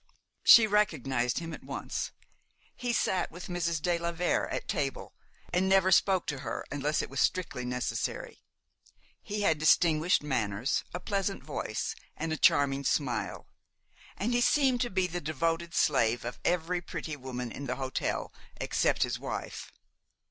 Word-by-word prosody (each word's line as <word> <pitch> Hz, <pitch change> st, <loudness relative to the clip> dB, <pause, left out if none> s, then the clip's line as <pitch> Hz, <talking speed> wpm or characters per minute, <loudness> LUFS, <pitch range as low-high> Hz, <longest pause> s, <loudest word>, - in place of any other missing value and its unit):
She 230 Hz, -, +9 dB
recognized 135 Hz, -, +1 dB
him 165 Hz, -1 st, -4 dB
at -, -, -9 dB
once. -, -, -4 dB, 0.6 s
He 245 Hz, -1 st, -2 dB
sat 190 Hz, -4 st, +1 dB
with 175 Hz, +2 st, -8 dB
Mrs. 170 Hz, -2 st, -1 dB
de 170 Hz, +2 st, 0 dB
la 170 Hz, 0 st, -1 dB
Vere 175 Hz, +1 st, 0 dB
at -, -, -4 dB
table, 135 Hz, -2 st, -2 dB, 0.4 s
and 185 Hz, +2 st, +2 dB
never 190 Hz, -1 st, +4 dB
spoke 190 Hz, 0 st, +4 dB
to 145 Hz, -4 st, -3 dB
her -, -, -4 dB
unless 145 Hz, +2 st, 0 dB
it -, -, -6 dB
was 135 Hz, -, -3 dB
strictly 160 Hz, -9 st, 0 dB
necessary. 125 Hz, 0 st, -3 dB, 0.8 s
He 210 Hz, +1 st, -4 dB
had 160 Hz, -6 st, +2 dB
distinguished 160 Hz, +1 st, +4 dB
manners, 115 Hz, -4 st, 0 dB
a 180 Hz, -, -4 dB
pleasant 195 Hz, +1 st, -2 dB
voice, -, -, -3 dB, 0.2 s
and 160 Hz, +1 st, -2 dB
a -, -, -2 dB
charming 140 Hz, -1 st, +3 dB
smile, 135 Hz, -2 st, -1 dB, 0.7 s
and 230 Hz, +5 st, -1 dB
he 240 Hz, -, +3 dB
seemed 260 Hz, -2 st, +3 dB
to 240 Hz, -, 0 dB
be 190 Hz, -2 st, +1 dB
the 175 Hz, 0 st, -3 dB
devoted 165 Hz, +3 st, -1 dB
slave 120 Hz, -5 st, +2 dB
of 120 Hz, -, -5 dB
every 175 Hz, 0 st, 0 dB
pretty 165 Hz, -3 st, -5 dB
woman 125 Hz, -3 st, -5 dB
in 140 Hz, -, -6 dB
the 125 Hz, -, -1 dB
hotel 130 Hz, -1 st, -2 dB, 0.3 s
except -, -, +1 dB
his -, -, -2 dB
wife. -, -, -5 dB
165 Hz, 155 wpm, -30 LUFS, 135-185 Hz, 0.8 s, She